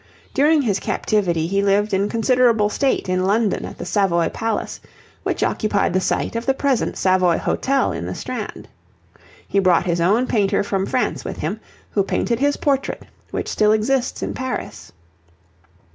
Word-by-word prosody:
During 295 +1 +3
his 200 -5 0
captivity 175 -7 0
he 195 +4 0
lived 200 +1 +2
in 200 +2 +1
considerable 230 -2 +3
state 270 +1 0
in 185 0 0
London 205 +2 +1
at - - -9
the - - -6
Savoy 180 -3 +1
Palace, 225 -1 -3 0.4
which - - -1
occupied 205 -4 0
the 185 - +2
site - - -1
of 230 +2 -3
the 270 - +3
present 270 -3 0
Savoy 185 -2 +3
Hotel 275 0 0
in - - -4
the - - -4
Strand; - - -6 0.8
he 200 - +1
brought 185 -2 +3
his 170 -1 0
own 210 +9 +3
painter 205 -5 +1
from 195 -1 -1
France 255 - -1
with - - -6
him, 185 +8 -3 0.3
who 200 - +2
painted 230 +4 -1
his 285 +1 +1
portrait 275 -2 -1 0.2
which - - -4
still 210 0 +3
exists 245 +4 0
in - - -3
Paris. 260 0 -5
210 Hz, 165 wpm, -21 LUFS, 190-250 Hz, 0.8 s, During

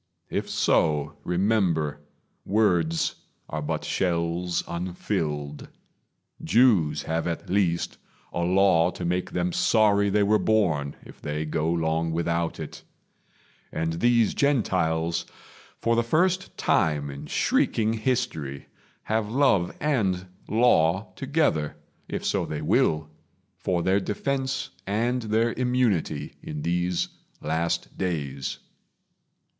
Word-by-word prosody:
If - - -2
so, 75 -2 +2
remember 90 -6 +1 0.4
Words 90 -6 +1 0.3
are 75 - -4
but 75 - -2
shells 85 -1 0
unfilled. 85 -5 -3 0.8
Jews 90 - +4
have 80 +1 -1
at 85 +1 -4
least 90 -4 0 0.3
A - - -2
Law 90 -1 +4
to 90 - -6
make 90 +1 -1
them 90 0 -1
sorry 100 -2 +3
they 105 +1 +3
were 105 +1 +3
born 80 -10 +1
If - - -14
they 75 +1 -3
go 80 +1 -1
long 80 0 0
without 85 0 -1
it; - - -7 0.9
and 80 +1 -2
these 120 -3 +3
Gentiles, 85 - +1 0.5
For 115 0 +1
the 115 - +3
first 180 +10 +1
time 75 -5 +1
in 70 - -8
shrieking 110 0 +1
history, 110 - -2 0.3
Have 110 -1 -1
love 115 -8 +3
and 100 -11 0 0.2
law 105 -4 +3
together, 135 - 0 0.3
if - - -4
so - - +1
they - - -4
will, 80 0 +2 0.5
For 90 -2 0
their 95 +1 +3
defense 130 +7 -2 0.2
and 120 +5 0
their 110 +1 +1
immunity 115 - 0
In 75 -1 -6
these 90 +1 0 0.3
last 80 +2 -2
days. 70 -8 -2
90 Hz, 115 wpm, -26 LUFS, 80-110 Hz, 0.9 s, Jews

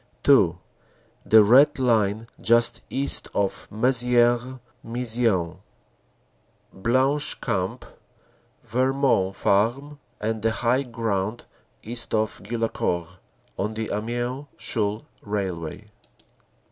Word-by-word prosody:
(2) - - +4 0.7
The 110 -1 +7
Red 130 +10 +5
Line, 110 -4 +1 0.2
just 115 +1 +3
east 140 +2 0
of 100 -1 -1
Mezieres 120 +2 +2 0.2
Maison 115 -8 -1 1.1
Blanche 130 +8 0
Camp 95 -6 -3 0.8
Vermont 125 -4 +1
Farm 130 +9 0 0.2
and 110 0 -2
the 115 - +2
high 120 +3 +1
ground 115 -4 -3 0.4
east 120 0 -1
of 110 0 -1
Guillaucourt, 95 -5 -3 0.4
on 105 +2 -2
the 110 0 -4
Amiens 120 +6 -3
Chaulnes 105 -1 -1 0.2
railway. 95 -2 -4
115 Hz, 90 wpm, -24 LUFS, 105-125 Hz, 1.1 s, The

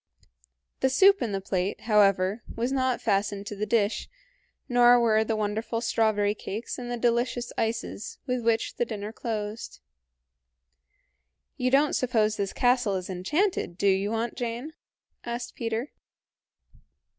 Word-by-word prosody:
The 265 - +2
soup 395 +9 +5
in 230 - -1
the 195 - -1
plate, 190 0 -2
however, 200 -1 +3
was 240 +3 -1
not 260 -2 0
fastened 200 -1 0
to 205 - -6
the 210 +1 -3
dish, 215 -2 0 0.6
nor 245 -1 +6
were 220 -2 +3
the 220 0 -1
wonderful 215 +2 -2
strawberry 220 -3 +1
cakes 215 +3 -6
and 245 -1 -6
the 245 - -2
delicious 240 +1 0
ices 225 -2 -3
with 250 -2 -1
which 225 0 0
the - - +2
dinner 215 -1 -6
closed. 220 -1 -5 1.8
"You 255 - 0
don't 280 +3 +3
suppose 220 -4 +1
this 200 -2 -2
castle 245 -5 +2
is 185 0 -4
enchanted, 190 - -1
do - - -2
you, 195 +1 +2
Aunt 230 +1 -2
Jane?" 240 +6 -4 0.5
asked 240 0 -5
Peter. 230 +4 -3
225 Hz, 140 wpm, -27 LUFS, 205-245 Hz, 1.8 s, nor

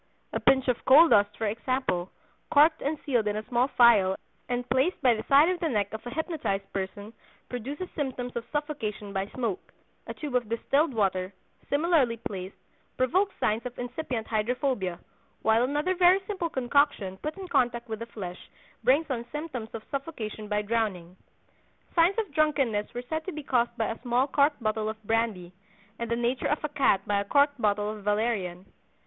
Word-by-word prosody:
A - - 0
pinch 265 0 +3
of 250 -2 0
coal 315 +5 +8
dust, 205 0 +4
for 225 - -2
example, 220 -4 -1 0.4
corked 310 +2 +5
and 305 +3 -1
sealed 240 -6 +1
in 210 - 0
a 215 0 -4
small 245 0 +2
phial 225 -8 +5 0.3
and 245 0 -2
placed 260 +9 +1
by 250 -2 +6
the 220 - -3
side 285 +3 +7
of 365 -1 0
the 330 - 0
neck 205 -5 -1
of 220 - -6
a - - -3
hypnotized 295 - -3
person, 200 +3 -5 0.4
produces 275 +9 -5
symptoms 255 -4 -3
of 235 - -2
suffocation 250 -9 -3
by 195 0 -1
smoke; 225 -5 -4 0.4
a - - -4
tube 295 -4 -6
of 245 -4 0
distilled 275 +7 +1
water, 190 -5 0 0.4
similarly 285 -6 +2
placed, 190 -3 -6 0.4
provokes 370 +10 +1
signs 215 +2 +1
of 250 -1 -7
incipient 245 -2 -4
hydrophobia; 220 - -1 0.5
while 220 +1 +4
another 295 +8 +1
very 365 +1 +5
simple 370 -5 -2
concoction 260 -8 +1
put 305 - -5
in 385 -1 -7
contact 245 -7 +1
with 220 -1 -5
the 230 - -6
flesh 185 -6 -8 0.3
brings 275 +7 +3
on 235 -3 -2
symptoms 295 -7 -5
of 220 - -6
suffocation 235 -7 -5
by 210 0 0
drowning." 205 -6 -2 0.8
Signs 345 +4 +4
of 425 -9 -2
drunkenness 275 -9 +1
were 245 - -4
said 315 +5 -3
to 375 - -3
be 305 -3 -7
caused 240 -3 0
by 225 - +1
a 225 - -8
small 245 +1 +2
corked 285 -1 +1
bottle 215 0 0
of 220 0 -7
brandy, 215 -5 -1 0.5
and 235 -1 -3
the 235 - +1
nature 240 +2 0
of 295 - -1
a 300 - -1
cat 275 -9 +2
by 205 -1 +1
a - - 0
corked 285 +2 +3
bottle 210 0 +1
of 215 -1 -9
valerian. 205 -4 -1
240 Hz, 185 wpm, -27 LUFS, 210-285 Hz, 0.8 s, coal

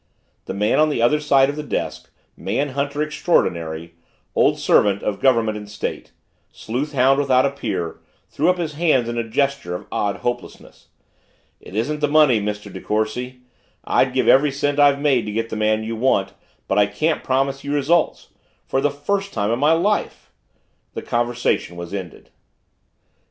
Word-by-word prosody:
The - - -5
man 105 +6 +1
on 155 0 +4
the 145 - -2
other 120 +6 +3
side 140 -3 +4
of 145 - -3
the 150 - -4
desk, 150 - -4 0.3
man 130 +9 -2
hunter 140 +2 -2
extraordinary, 85 - -1 0.4
old - - +3
servant 100 -1 +2
of 100 -2 -2
Government 115 -5 +2
and 105 -1 -11
State, 105 - -5 0.4
sleuthhound 135 +2 0
without 130 -2 +3
a 140 - +1
peer, 100 -12 -4 0.3
threw 160 +5 0
up 180 - +2
his 165 -3 -3
hands 145 -6 +2
in 120 0 -2
a - - 0
gesture 140 -8 -1
of - - -7
odd 100 -1 -1
hopelessness. 120 0 -5 0.7
"It 95 - -12
isn't 145 +8 -1
the 150 - +1
money, 145 -7 +4
Mr. 105 0 -5
De - - -7
Courcy 125 +4 -2 0.4
I'd - - +2
give - - 0
every 145 +3 +5
cent 145 +1 -1
I've 140 -1 +5
made 135 -6 +1
to - - -3
get 115 +2 -2
the - - -4
man 110 0 +1
you 115 +1 -4
want 110 -5 +1 0.3
but 100 - +1
I 100 - +4
can't 155 +11 -1
promise 135 +1 0
you 140 - -4
results 150 +3 +1 0.4
for 135 - 0
the 145 - +2
first 195 +8 -3
time 105 0 0
in 120 - 0
my 150 +3 +4
life." 200 +6 -1 0.6
The - - -5
conversation 120 -6 -1
was 85 +1 -7
ended. 95 -4 -7
130 Hz, 175 wpm, -21 LUFS, 105-145 Hz, 0.7 s, every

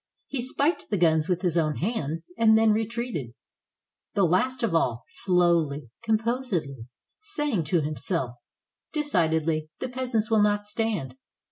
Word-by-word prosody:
He 270 - -3
spiked 280 +6 0
the 205 - 0
guns 160 -2 +3
with 180 0 0
his 175 -2 +1
own 155 -2 0
hands 165 - -3
and 220 -1 +5
then 220 0 +5
retreated, 220 - -2 0.4
— - - -63
the 200 - +3
last 210 +10 +1
of 220 -7 +1
all, 125 -7 +1
slowly, 170 - +1
composedly, 220 - -1 0.3
saying 295 - -1
to 165 +2 +2
himself, 155 -1 -1 0.6
"Decidedly, 160 - +1
the 255 - -4
peasants 245 -4 -1
will 220 -1 +5
not 205 0 +2
stand. 210 - -2
185 Hz, 140 wpm, -26 LUFS, 160-230 Hz, 0.6 s, and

